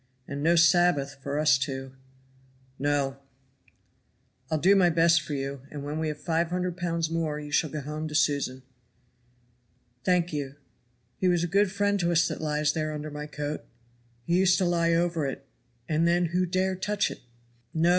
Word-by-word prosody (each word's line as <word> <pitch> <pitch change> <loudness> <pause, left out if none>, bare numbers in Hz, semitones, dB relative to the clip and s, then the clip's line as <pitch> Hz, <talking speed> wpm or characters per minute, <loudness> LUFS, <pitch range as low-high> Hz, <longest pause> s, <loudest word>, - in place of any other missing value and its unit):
"And 140 0 -5
no 165 +3 +4
Sabbath 165 -4 +3
for 140 +1 -3
us 150 -4 +4
two." 135 -1 -4 0.9
"No!" 140 -1 0 1.3
"I'll 160 - +1
do 190 +6 +5
my 185 -3 +5
best 165 0 +4
for 150 -1 -5
you, 135 -1 -4
and 145 -2 -7
when 150 +2 -4
we 160 - -1
have 150 -1 -3
five 165 0 0
hundred 180 0 -2
pounds 170 -2 -2
more 160 -2 -1
you 150 -1 -8
shall 155 +1 +2
go 150 +1 -4
home 150 +3 -5
to 150 - -6
Susan." 140 -4 +1 1.4
"Thank 180 -2 +1
you. 140 -2 -4 0.6
He 185 - +1
was 175 -2 +2
a - - 0
good 200 -1 +4
friend 205 0 +1
to 175 -1 +1
us 170 0 +3
that - - -5
lies 150 -1 0
there 155 -1 -2
under 150 0 -5
my 150 0 -6
coat; 150 0 -4 0.6
he 170 +5 +1
used 185 -2 +4
to 185 - +1
lie 170 -1 +2
over 170 -3 0
it, 135 0 -6 0.4
and 160 +1 +2
then 175 +1 +3
who 180 0 +2
dare 185 +2 0
touch 205 +2 -1
it?" - - -9 0.5
"No! 165 +2 +2
160 Hz, 185 wpm, -27 LUFS, 145-175 Hz, 1.4 s, do